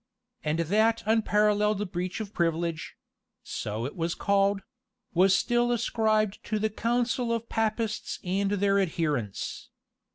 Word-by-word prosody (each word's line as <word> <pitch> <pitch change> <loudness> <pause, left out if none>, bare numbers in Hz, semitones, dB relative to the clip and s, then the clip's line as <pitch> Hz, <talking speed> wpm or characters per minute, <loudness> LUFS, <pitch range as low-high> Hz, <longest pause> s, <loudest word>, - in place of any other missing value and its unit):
And 150 +1 0
that 215 +7 +2
unparalleled 210 -2 +2
breach 180 +3 -3
of 215 -1 -6
privilege 165 -1 -1 0.5
so 110 +2 -4
it 135 - -5
was 170 -1 -1
called 200 0 +2 0.5
was 185 +2 +5
still 240 +2 +1
ascribed 215 -3 +1
to 215 - -1
the 215 +1 0
counsel 240 +2 0
of 230 0 -2
Papists 220 0 -1
and 195 +2 0
their 200 0 +2
adherents. 150 - -2
205 Hz, 125 wpm, -28 LUFS, 175-220 Hz, 0.5 s, was